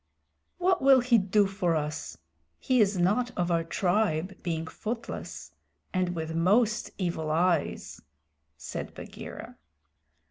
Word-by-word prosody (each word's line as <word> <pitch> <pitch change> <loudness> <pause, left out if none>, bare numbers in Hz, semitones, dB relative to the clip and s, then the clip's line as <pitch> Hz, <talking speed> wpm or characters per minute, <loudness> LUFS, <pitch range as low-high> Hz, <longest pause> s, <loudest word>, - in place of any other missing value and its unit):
"What 370 +1 +2
will 270 -1 +7
he 240 -2 +4
do 200 +1 +3
for 190 -4 0
us? 150 0 -3 0.4
He 255 -3 +2
is 200 -2 +2
not 210 +8 +2
of 175 -1 0
our 165 -1 +2
tribe, 185 0 0
being 165 -2 -2
footless 230 +8 -6 0.4
and 180 -1 0
with 160 -1 -4
most 215 +6 +2
evil 170 -4 -2
eyes," 165 0 0 0.6
said - - -6
Bagheera. - - -9
185 Hz, 120 wpm, -28 LUFS, 165-215 Hz, 0.6 s, will